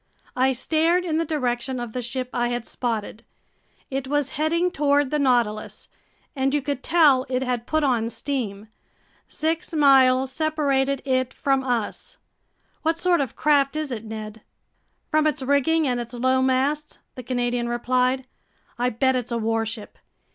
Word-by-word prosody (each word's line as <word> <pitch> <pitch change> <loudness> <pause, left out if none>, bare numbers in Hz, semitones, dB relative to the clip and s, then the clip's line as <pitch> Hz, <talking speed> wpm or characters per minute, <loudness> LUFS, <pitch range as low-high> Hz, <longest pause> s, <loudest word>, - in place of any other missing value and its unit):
I 260 +1 +3
stared 325 +7 +1
in 320 -3 0
the 330 - 0
direction 255 -4 -2
of 240 -2 -6
the 250 - -2
ship 250 +1 -4
I 240 -1 +1
had 240 -1 -3
spotted. 225 -3 -3 0.7
It 270 0 -3
was 290 -1 0
heading 335 +4 0
toward 285 -3 +2
the 300 - +1
Nautilus, 240 -6 0 0.5
and 270 +1 +1
you 295 - +1
could 280 -2 -3
tell 295 -6 +4
it 255 0 0
had 245 -2 -2
put 310 0 +1
on 240 -5 +1
steam. 225 -7 -4 0.6
Six 320 +1 -2
miles 265 -3 +5
separated 275 -3 0
it 255 -1 0
from 270 -1 +1
us. 240 -5 -3 0.6
"What 325 +1 0
sort 350 -2 +2
of 270 - -4
craft 285 -1 +2
is 305 -3 -3
it, 225 -3 -4
Ned?" 215 -1 -7 0.7
"From 310 0 +3
its 300 -2 -1
rigging 285 +3 +2
and 245 -1 0
its 240 +1 -6
low 260 +2 +2
masts," 270 +4 0 0.2
the 255 - -8
Canadian 245 -1 -1
replied, 255 +2 0 0.5
"I 245 +1 +2
bet 260 +3 +1
it's 250 -1 -3
a 235 - 0
warship. 225 -1 -3
260 Hz, 160 wpm, -24 LUFS, 240-290 Hz, 0.7 s, miles